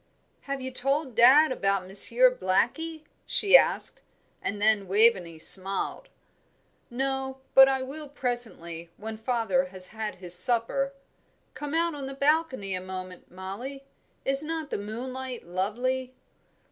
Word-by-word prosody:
"Have 275 -1 -5
you 260 0 -6
told 275 +1 0
dad 265 +6 +5
about 195 -5 -1
Monsieur 235 +6 +3
Blackie?" 305 - -2 0.2
she 405 +3 +3
asked; - - +2 0.4
and 205 - -4
then 210 -2 +2
Waveney 190 -5 +2
smiled. 190 +4 +1 0.8
"No, 265 +1 -3
but 270 0 +8
I 265 -1 -1
will, 290 +3 -8
presently, 225 - -4
when 220 +1 -7
father 220 -5 -1
has 185 0 -8
had 220 -1 -6
his 180 -1 0
supper. 245 +5 +5 0.6
Come 295 +1 -6
out 335 0 +1
on 280 -2 -7
the 270 - -8
balcony 280 -8 -1
a 185 - -4
moment, 185 -1 -9
Mollie. 205 +10 -8 0.4
Is 270 +1 +2
not 315 -1 -5
the - - -3
moonlight 250 +4 -7
lovely!" 245 +8 -3
245 Hz, 135 wpm, -26 LUFS, 195-270 Hz, 0.8 s, but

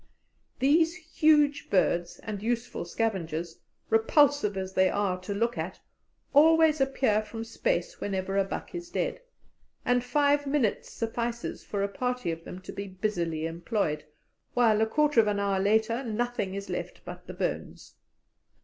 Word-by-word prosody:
These 320 +5 +3
huge 305 -3 +2
birds 175 -2 +1
and 210 -3 -5
useful 235 -2 -2
scavengers, 170 -5 -2 0.3
repulsive 225 -1 +3
as 190 0 -4
they 185 0 +4
are 195 -2 0
to 185 - -6
look 235 +3 0
at, - - -4 0.5
always 315 0 +6
appear 265 -5 +2
from 225 +1 -7
space - - -2
whenever 195 -1 -2
a 195 - +4
buck 195 - -6
is 345 0 -6
dead, - - -2 0.6
and 245 -1 +2
five 285 +2 +2
minutes 275 -7 0
suffices 235 +1 -3
for 200 -1 -2
a - - +1
party 250 -1 -2
of 165 0 -6
them 185 - -8
to - - -8
be 200 0 -6
busily 175 -5 -2
employed, 165 -2 -2 0.5
while 225 -3 +4
a 220 - +3
quarter 295 +1 +3
of 220 - +5
an 205 -1 +1
hour 200 -1 +1
later 220 +5 +2
nothing 230 -4 -2
is 200 0 -5
left - - -5
but - - -9
the - - -6
bones. - - -4
220 Hz, 155 wpm, -28 LUFS, 195-275 Hz, 0.6 s, always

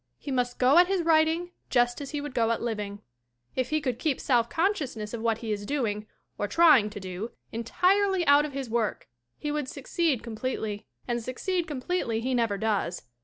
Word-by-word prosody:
He 285 - -6
must 245 -1 0
go 265 +6 +6
at 355 - +6
his 380 -2 +1
writing 325 +2 +3 0.2
just 245 +1 +2
as 280 - -6
he 295 -2 -3
would 290 -2 -6
go 230 -2 +2
at 230 - +1
living. 210 -3 -4 0.5
If 255 -1 0
he 310 - +1
could 255 -5 -2
keep 290 -2 0
self 235 -3 +2
consciousness 295 - -1
of 235 - -4
what 225 -1 +1
he 220 - -2
is 205 -1 -2
doing 215 -4 -2 0.3
or 205 - 0
trying 295 -6 +6
to 205 - -8
do 190 +4 -5 0.2
entirely 365 - +2
out 285 0 +6
of 300 -2 -5
his 270 -2 -4
work 225 -1 -1 0.3
he 295 - -3
would 295 -2 -2
succeed 290 -1 -1
completely. 220 -2 -4 0.2
And 240 -1 -1
succeed 335 +9 -2
completely 260 -4 -1
he 255 +3 -1
never 230 -5 +1
does. 200 -4 -1
255 Hz, 195 wpm, -27 LUFS, 225-305 Hz, 0.5 s, go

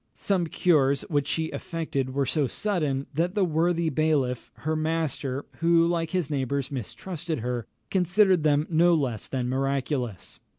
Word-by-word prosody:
Some 185 -4 0
cures 140 -6 +2
which 145 -2 +1
she 160 +1 -1
effected 145 -6 -3
were 140 -1 +2
so 145 0 +1
sudden, 150 - -1
that 175 +6 0
the 200 -3 +3
worthy 170 0 +1
bailiff, 140 -5 0
her 155 +2 -2
master, 155 -4 -1
who, 165 0 +4
like 170 -1 0
his 180 -3 -1
neighbours, 140 -1 -1
mistrusted 155 - -5
her, 120 0 -3 0.2
considered 185 0 +3
them 150 0 +3
no 170 +1 +4
less 130 -8 -1
than 125 -2 -2
miraculous. 130 - -2
155 Hz, 145 wpm, -26 LUFS, 135-170 Hz, 0.2 s, who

